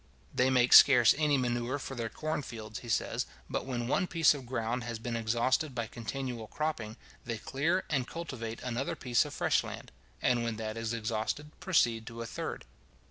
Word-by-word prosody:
They 130 Hz, +1 st, +3 dB
make 125 Hz, -1 st, +4 dB
scarce 125 Hz, -5 st, +9 dB
any 150 Hz, -2 st, +2 dB
manure 120 Hz, +1 st, -1 dB
for 135 Hz, -, -6 dB
their 115 Hz, -3 st, -3 dB
corn 155 Hz, +6 st, -3 dB
fields, 110 Hz, -4 st, -7 dB
he 120 Hz, -, -10 dB
says; -, -, 0 dB, 0.2 s
but -, -, -3 dB
when 120 Hz, -3 st, -2 dB
one 180 Hz, +8 st, +1 dB
piece 165 Hz, -3 st, +4 dB
of 135 Hz, -4 st, -8 dB
ground 120 Hz, 0 st, -2 dB
has 120 Hz, -1 st, -4 dB
been 115 Hz, +1 st, -4 dB
exhausted 120 Hz, +5 st, +1 dB
by 115 Hz, -2 st, -1 dB
continual 120 Hz, 0 st, -5 dB
cropping, 115 Hz, -5 st, -3 dB, 0.3 s
they 115 Hz, -1 st, -3 dB
clear 155 Hz, -, 0 dB
and 135 Hz, -5 st, 0 dB
cultivate 125 Hz, -9 st, -6 dB
another 125 Hz, +2 st, -2 dB
piece 120 Hz, -3 st, +2 dB
of -, -, -7 dB
fresh -, -, +2 dB
land; -, -, -8 dB, 0.3 s
and 120 Hz, -1 st, +2 dB
when 115 Hz, -1 st, -2 dB
that 110 Hz, 0 st, -4 dB
is 115 Hz, 0 st, -3 dB
exhausted, 115 Hz, +6 st, -2 dB
proceed 115 Hz, -11 st, +2 dB
to 115 Hz, 0 st, -6 dB
a -, -, -6 dB
third. -, -, -5 dB
120 Hz, 190 wpm, -31 LUFS, 115-135 Hz, 0.3 s, scarce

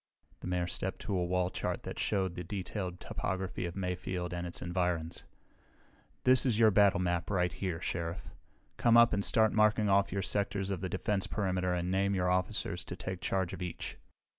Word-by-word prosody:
The -, -, -7 dB
Mayor 90 Hz, -1 st, 0 dB
stepped 85 Hz, -, -2 dB
to 100 Hz, -, -2 dB
a 90 Hz, -, +1 dB
wall 90 Hz, +1 st, 0 dB
chart -, -, -3 dB
that -, -, -6 dB
showed 95 Hz, -4 st, 0 dB
the 90 Hz, -, -5 dB
detailed 90 Hz, 0 st, -4 dB
topography 95 Hz, 0 st, -3 dB
of 85 Hz, -, -7 dB
Mayfield 90 Hz, -1 st, -3 dB
and 90 Hz, 0 st, -3 dB
its 85 Hz, -, -6 dB
environs. 85 Hz, -2 st, -2 dB, 1.0 s
"This 130 Hz, -1 st, +6 dB
is 120 Hz, -5 st, +2 dB
your 110 Hz, -1 st, +6 dB
battle 100 Hz, -2 st, +5 dB
map 90 Hz, -2 st, -1 dB
right 90 Hz, -4 st, +1 dB
here, 90 Hz, -2 st, -3 dB
Sheriff. 85 Hz, -1 st, -4 dB, 0.5 s
Come 120 Hz, -1 st, +5 dB
up 120 Hz, -1 st, +7 dB
and 100 Hz, -1 st, +1 dB
start 110 Hz, +1 st, +4 dB
marking 105 Hz, -1 st, +3 dB
off 100 Hz, 0 st, +3 dB
your 100 Hz, +1 st, -1 dB
sectors 100 Hz, 0 st, 0 dB
of 95 Hz, -3 st, -3 dB
the 95 Hz, -, -2 dB
defense 95 Hz, +1 st, -1 dB
perimeter 90 Hz, -3 st, 0 dB
and 90 Hz, +1 st, -2 dB
name 100 Hz, +1 st, +1 dB
your 90 Hz, -1 st, +1 dB
officers 90 Hz, 0 st, -1 dB
to -, -, -6 dB
take 95 Hz, -2 st, -5 dB
charge 95 Hz, 0 st, -1 dB
of -, -, -7 dB
each. 90 Hz, -1 st, -5 dB
95 Hz, 190 wpm, -32 LUFS, 90-100 Hz, 1.0 s, up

